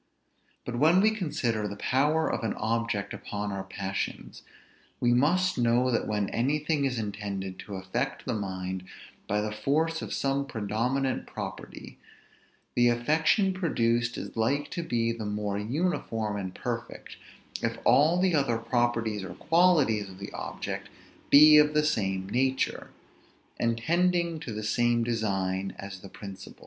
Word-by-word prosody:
But 120 -1 -4
when 160 +6 +5
we 215 +3 +5
consider 135 - -1
the 100 - -6
power 150 +9 +1
of - - -2
an 110 - -1
object 110 -2 -1
upon 105 0 -4
our 95 -1 -4
passions, 95 0 -5 0.6
we 120 0 +3
must 175 +7 +2
know 120 +2 +3
that 115 - 0
when 105 -2 0
anything 145 +4 0
is 130 -3 -1
intended 100 -3 -4
to 100 - -7
affect 120 +9 -3
the - - -1
mind 95 -3 -4 0.4
by 105 +1 +1
the 105 0 -2
force 155 +10 0
of - - -6
some 140 0 0
predominant 125 +4 -1
property, - - -8 0.7
the 120 0 +4
affection 160 - +2
produced 120 -10 0
is - - -7
like 135 +6 0
to 170 - -3
be 115 -8 0
the 115 -1 -5
more 105 -1 -2
uniform 115 - -1
and 95 -2 -5
perfect, - - -5 0.4
if - - -1
all 160 +5 +5
the 185 -1 +2
other 140 -6 +2
properties 115 -3 0
or 90 -2 -7
qualities 155 - +3
of 95 - -12
the 100 - -7
object - - -5 0.4
be 150 +1 +9
of 150 0 +3
the 150 0 +3
same 95 -9 0
nature, 130 +5 0 0.7
and 115 -1 +1
tending 170 +4 +1
to 140 -7 -6
the 110 0 -4
same 120 +2 +2
design 95 -5 -1
as 100 -1 -8
the 100 - -11
principal. 95 -2 -10
120 Hz, 150 wpm, -28 LUFS, 105-150 Hz, 0.7 s, be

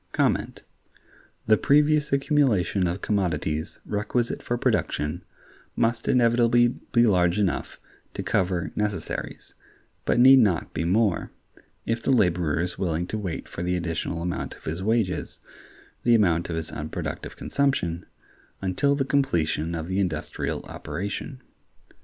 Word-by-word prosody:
The 110 0 +5
previous 150 +1 +3
accumulation 135 - +2
of 85 +3 -4
commodities 85 -6 -1
requisite 110 +3 -1
for 120 - -2
production 75 -6 -1 0.5
must 115 0 0
inevitably 120 0 +4 0.2
be 120 0 +5
large 90 -3 +3
enough 100 -4 -1 0.4
to 95 - -3
cover 95 -4 0
necessaries, 105 -2 -4 0.5
but - - +2
need 130 +2 +8
not 100 -9 +1
be 80 - -2
more, 100 +1 +1 0.6
if 115 0 -1
the - - -2
laborer 90 - +2
is 90 0 -3
willing 85 -2 -1
to 110 - -2
wait 95 -5 -5
for - - -7
the 90 +1 0
additional 85 -1 -3
amount 90 0 -3
of - - -19
his 80 +4 -4
wages 105 -4 -1 0.6
(the 120 -1 +4
amount 85 -6 +2
of 85 - -2
his 80 -1 -4
unproductive 75 +1 -5
consumption) 90 -12 -1 0.5
until 95 +10 +1
the 135 -1 0
completion 85 - 0
of 80 0 -4
the 95 +2 -1
industrial 90 -6 -2
operation. 100 +7 -6
100 Hz, 130 wpm, -25 LUFS, 85-120 Hz, 0.6 s, need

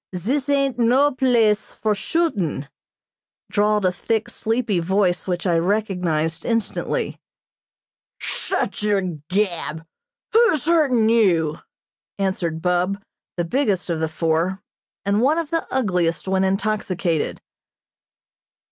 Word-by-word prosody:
Zis 260 - -1
ain't 275 -3 +1
no 260 +5 +4
place 235 -5 +2
for 215 -1 0
shootin'," 200 - -1 0.8
drawled 210 -1 +2
a 185 - +3
thick, 225 +5 -2
sleepy 225 -5 0
voice 185 +1 +1
which 180 0 -2
I 175 -3 +3
recognized 175 -5 0
instantly. 230 -2 -2 1.0
"Shut - - -2
yer 205 -1 +2 0.3
gab! 175 -5 -1 0.5
Who's 450 - +4
hurtin' 285 -9 +3
you?" 175 -9 +3 0.6
answered 175 -5 -2
Bub, 180 +2 +1 0.4
the 175 - 0
biggest 195 -4 0
of 165 - -1
the 160 - 0
four, 165 +4 -1 0.4
and 200 +2 +2
one 290 +6 +3
of 330 -3 -3
the 330 -1 -1
ugliest 180 -9 0
when 190 0 +2
intoxicated. 190 -4 -1
200 Hz, 110 wpm, -22 LUFS, 175-235 Hz, 1.0 s, no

